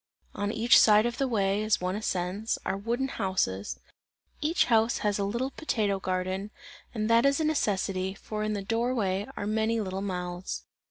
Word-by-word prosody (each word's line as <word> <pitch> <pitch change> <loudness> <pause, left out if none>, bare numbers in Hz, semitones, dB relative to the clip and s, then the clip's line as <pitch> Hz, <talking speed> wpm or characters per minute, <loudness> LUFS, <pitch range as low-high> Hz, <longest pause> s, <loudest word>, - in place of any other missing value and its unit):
On 205 0 -2
each 225 +2 +5
side 215 0 +6
of 240 0 -2
the 270 - +2
way, 200 -3 +1
as 215 -1 +2
one 180 +1 -2
ascends, 200 +1 -2
are 190 - 0
wooden 235 +6 -1
houses; 185 - -2 0.6
each 315 +4 +2
house 225 0 +3
has 205 -1 +1
a - - +1
little 235 +7 -1
potato 210 -11 -1
garden, 185 +2 -2 0.4
and 215 -3 -2
that 230 +1 +5
is 275 +1 +3
a - - +1
necessity, 195 -10 0
for 215 +1 -5
in 215 0 -1
the 200 -1 -3
door 230 +5 0
way 195 -2 -1
are - - -3
many 220 +2 +1
little 190 -2 -3
mouths. 180 -2 -4
210 Hz, 180 wpm, -28 LUFS, 190-230 Hz, 0.6 s, side